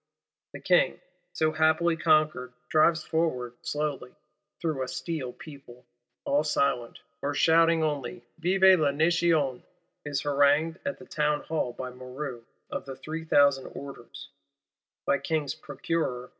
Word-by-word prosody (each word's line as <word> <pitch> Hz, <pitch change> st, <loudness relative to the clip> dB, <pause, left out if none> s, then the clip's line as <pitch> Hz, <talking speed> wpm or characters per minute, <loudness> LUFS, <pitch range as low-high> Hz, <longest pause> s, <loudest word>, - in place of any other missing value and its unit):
The -, -, -7 dB
King, -, -, +2 dB, 0.3 s
so 155 Hz, 0 st, +1 dB
happily 160 Hz, +2 st, +2 dB
conquered, 155 Hz, -6 st, +2 dB, 0.2 s
drives 160 Hz, +1 st, +3 dB
forward, 130 Hz, -7 st, -1 dB
slowly, 145 Hz, -4 st, -3 dB, 0.4 s
through 155 Hz, -6 st, -2 dB
a 130 Hz, -, -2 dB
steel 150 Hz, -4 st, -4 dB
people, 130 Hz, -4 st, -13 dB, 0.4 s
all 145 Hz, +2 st, +2 dB
silent, 140 Hz, -5 st, 0 dB, 0.2 s
or 145 Hz, 0 st, -2 dB
shouting 165 Hz, +1 st, +4 dB
only 145 Hz, -5 st, -3 dB, 0.2 s
Vive 190 Hz, +2 st, +5 dB
la 150 Hz, -2 st, +3 dB
Nation; 160 Hz, -3 st, +2 dB, 0.4 s
is 145 Hz, -2 st, -2 dB
harangued 145 Hz, +3 st, +2 dB
at 280 Hz, -, -2 dB
the -, -, -13 dB
Townhall, 150 Hz, -4 st, -1 dB
by 130 Hz, 0 st, -6 dB
Moreau 125 Hz, 0 st, -7 dB, 0.3 s
of -, -, -4 dB
the 135 Hz, -1 st, -7 dB
three 160 Hz, +4 st, -6 dB
thousand 140 Hz, -3 st, +4 dB
orders, 140 Hz, -4 st, -9 dB, 0.8 s
by 140 Hz, -, +2 dB
King's 145 Hz, 0 st, -1 dB
Procureur 145 Hz, -7 st, -3 dB
M. -, -, -14 dB
150 Hz, 130 wpm, -27 LUFS, 135-160 Hz, 0.8 s, Vive